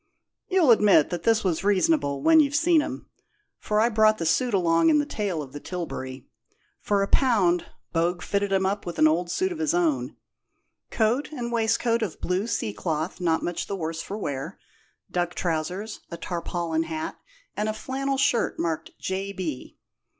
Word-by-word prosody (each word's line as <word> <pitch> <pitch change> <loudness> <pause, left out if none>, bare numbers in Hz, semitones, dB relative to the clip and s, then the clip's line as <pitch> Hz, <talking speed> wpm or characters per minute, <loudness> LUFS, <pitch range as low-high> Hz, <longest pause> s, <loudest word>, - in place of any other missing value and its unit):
You'll 365 -9 +4
admit 205 -9 +5
that 175 -2 -3
this 225 +3 +2
was 180 -3 0
reasonable 195 - +2
when 320 -1 +6
you've 285 -2 +3
seen 330 +1 +4
'em, - - -6 0.5
for 210 0 0
I 225 - +4
brought 215 -1 +4
the 165 - -3
suit 245 +10 +2
along 175 - +3
in 305 - +5
the 295 - +1
tail 200 - -3
of 130 - -12
the 145 - -6
tilbury. 135 -7 -6 0.5
For 200 -1 +1
a - - -1
pound, 195 -11 +2 0.3
Bogue 175 +2 0
fitted 200 0 -1
him 190 -1 +2
up 200 +2 -1
with 175 - -6
an 155 - +6
old 170 +3 +1
suit 375 - 0
of 340 - -5
his 320 +1 +1
own 335 -5 0 0.7
coat 240 +7 0
and 240 -5 -4
waistcoat 230 0 +1
of 200 -7 -3
blue 185 +4 -1
sea 110 - -2
cloth, 155 - -3
not 165 -2 +1
much 175 - -3
the 200 - -3
worse 165 -2 -4
for 200 - -6
wear, 145 -1 -4 0.5
duck 175 0 -1
trousers, 180 +6 -3
a 170 - -6
tarpaulin 170 -2 -2
hat, 160 -1 -4 0.4
and 210 +1 -1
a - - +2
flannel 270 +4 -2
shirt 265 -3 +1
marked 160 -1 -3
J. 195 +1 -3
B. 165 -9 -6
195 Hz, 180 wpm, -25 LUFS, 165-235 Hz, 0.7 s, when